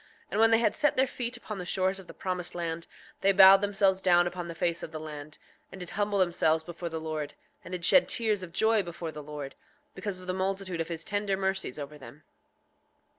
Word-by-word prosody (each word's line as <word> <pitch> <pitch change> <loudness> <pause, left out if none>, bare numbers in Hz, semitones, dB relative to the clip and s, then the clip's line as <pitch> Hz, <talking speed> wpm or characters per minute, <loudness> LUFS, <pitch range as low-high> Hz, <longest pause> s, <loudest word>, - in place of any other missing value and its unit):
And - - -1
when 225 0 +6
they 225 - +5
had 225 -2 +1
set 295 +1 +2
their 265 - +5
feet 245 -1 -3
upon 215 -4 -7
the - - -4
shores 190 +1 0
of 190 - -13
the - - -10
promised 180 -2 -4
land 170 -1 -4 0.3
they 195 - +5
bowed 195 0 +9
themselves 195 -2 +2
down 175 -2 +4
upon 175 0 -4
the 170 - -7
face 170 0 -1
of - - -7
the 155 - -6
land, 150 -1 -8 0.3
and 190 - -10
did 180 - -7
humble 205 0 0
themselves 170 -3 +2
before 170 +1 -6
the 160 0 -4
Lord, 155 -2 -4 0.3
and - - -11
did 175 -2 -2
shed 275 - +6
tears 215 -4 +2
of 180 -2 -8
joy 220 +3 +3
before 170 -2 -6
the 150 0 -8
Lord, 145 -2 -7 0.4
because 200 -3 -5
of 185 - -12
the 185 - -2
multitude 190 -2 -2
of 165 - -3
his 165 -1 -4
tender 205 -1 -1
mercies 190 -7 -1
over 150 0 -8
them. 145 +2 -13
185 Hz, 225 wpm, -29 LUFS, 165-195 Hz, 0.4 s, bowed